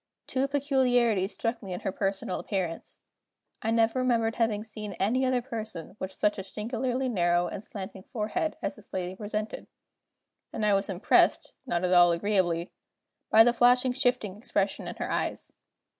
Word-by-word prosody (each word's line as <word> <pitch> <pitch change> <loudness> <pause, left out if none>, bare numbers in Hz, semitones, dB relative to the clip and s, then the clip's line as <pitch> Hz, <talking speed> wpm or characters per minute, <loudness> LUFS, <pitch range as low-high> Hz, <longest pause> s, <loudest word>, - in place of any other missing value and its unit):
Two 265 +1 0
peculiarities 250 -8 +2
struck 230 0 -2
me 190 -3 -6
in 180 - -5
her - - -2
personal 195 -1 -2
appearance. 180 -5 -4 0.6
I 220 - -1
never 225 +2 +2
remembered 230 -3 +1
having 220 -3 +1
seen 215 -2 -7
any 225 +9 +1
other 250 -1 +1
person 220 -8 -6
with 190 - -4
such 210 +1 0
a - - -4
singularly 245 +5 -2
narrow 175 -6 +2
and 190 +3 -6
slanting 190 -2 -8
forehead 215 +10 -2
as - - -2
this 210 - -14
lady 185 0 -3
presented; 210 +1 -4 0.8
and 215 - -2
I 210 - +4
was 195 +1 +1
impressed, 190 -1 +3
not 175 -7 0
at 180 0 +2
all 175 -1 +7
agreeably, 175 -2 0 0.6
by 225 - +8
the 240 +1 +4
flashing 245 +1 +4
shifting 245 -7 0
expression 200 -3 -1
in - - -5
her - - -4
eyes. - - -2
215 Hz, 165 wpm, -28 LUFS, 190-240 Hz, 0.8 s, by